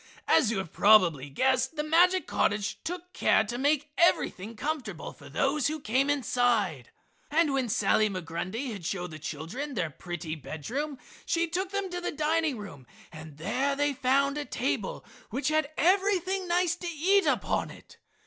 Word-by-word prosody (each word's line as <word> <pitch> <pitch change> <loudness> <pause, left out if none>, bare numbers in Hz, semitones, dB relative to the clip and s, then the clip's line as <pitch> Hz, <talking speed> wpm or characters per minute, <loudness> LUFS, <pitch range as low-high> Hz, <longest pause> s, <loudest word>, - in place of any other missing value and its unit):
As 265 -9 +4
you 225 - -1
have 190 -4 -5
probably 175 -10 +5
guessed, 260 - +1
the 300 - -1
magic 355 +4 +4
cottage 205 0 0
took 360 +1 -6
care 220 - +3
to 240 +3 -5
make 295 +1 +1
everything 230 - +2
comfortable 300 +3 -4
for - - -14
those 280 0 +1
who 310 +1 -3
came 265 +3 +1
inside. 235 - +1 0.4
And 305 -1 +2
when 260 -3 0
Sally 215 +1 +3
Migrundy 185 +7 -4
had 200 -5 -7
shown 180 +1 -3
the 155 - -8
children 170 - -5
their 170 -6 -1
pretty 170 0 -6
bed 155 -1 -7
room 290 +1 -2 0.3
she 335 0 +1
took 365 +3 -2
them 400 -1 -3
to 355 0 -4
the - - -2
dining 310 -2 0
room 145 - -10 0.2
and 155 -2 -11
there 265 - 0
they 290 0 +1
found 275 +2 +1
a - - -2
table - - -2 0.2
which 270 +1 -1
had 310 -2 +1
everything 380 +1 +2
nice 350 0 +2
to 355 - -6
eat 360 +5 +2
upon - - 0
it. - - -15
275 Hz, 170 wpm, -28 LUFS, 200-320 Hz, 0.4 s, probably